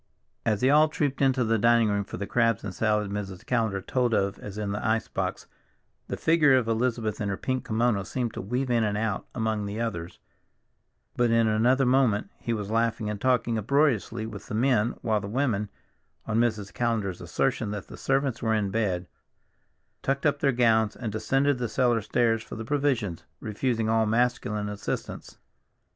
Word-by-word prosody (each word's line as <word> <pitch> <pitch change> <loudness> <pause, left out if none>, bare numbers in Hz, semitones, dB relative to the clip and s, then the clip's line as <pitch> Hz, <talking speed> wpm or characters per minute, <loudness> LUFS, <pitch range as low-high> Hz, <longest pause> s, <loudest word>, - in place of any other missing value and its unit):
As 105 -3 +1
they 130 +2 +4
all 155 +1 +5
trooped 145 -3 -1
into 130 -2 +3
the 115 -1 +1
dining 115 0 +4
room 100 -1 0
for - - -8
the 100 - -3
crabs 115 -1 +1
and 100 -3 -5
salad 105 -1 0
Mrs. 100 0 -5
Callender 110 -6 0
told 125 -1 +1
of 100 0 0
as 105 0 -8
in 105 -1 -2
the 100 - -3
ice 110 0 +1
box, - - -3 0.6
the - - -4
figure 160 -4 +4
of 120 -3 0
Elizabeth 115 -2 -1
in 100 - -1
her 100 - -2
pink 130 -1 -2
kimono 110 -2 +1
seemed 120 +4 -3
to - - -5
weave 125 +6 -2
in 115 -1 +3
and 105 -1 0
out 110 -2 -2
among 110 -3 -1
the 105 +2 -4
others, 85 -8 -4 1.0
but 120 -1 +2
in 115 0 +3
another 120 +5 +3
moment 125 -5 +2
he 115 - -3
was 105 -2 -3
laughing 115 -1 0
and 105 -1 -6
talking 125 -3 +1
uproariously 120 -2 +1
with 105 -2 -8
the - - -4
men, 120 -1 +2
while 110 -2 +1
the 100 - -5
women, 110 -3 0 0.6
on 110 0 0
Mrs. 110 -4 0
Callender's 110 -7 -1
assertion 110 - -1
that 105 -2 -5
the - - -10
servants 135 -2 0
were 110 -1 +1
in 100 -2 0
bed, 95 -5 0 1.0
tucked 140 +2 -1
up 145 -1 +2
their 140 - +3
gowns 110 -3 +3
and 115 -4 -4
descended 135 +5 +1
the 120 -2 -2
cellar 120 -1 +2
stairs 115 +1 +1
for - - -9
the 110 - -6
provisions, 130 - 0 0.2
refusing 115 +1 -1
all 110 0 +2
masculine 110 -2 0
assistance. 105 0 -5
115 Hz, 185 wpm, -27 LUFS, 105-125 Hz, 1.0 s, all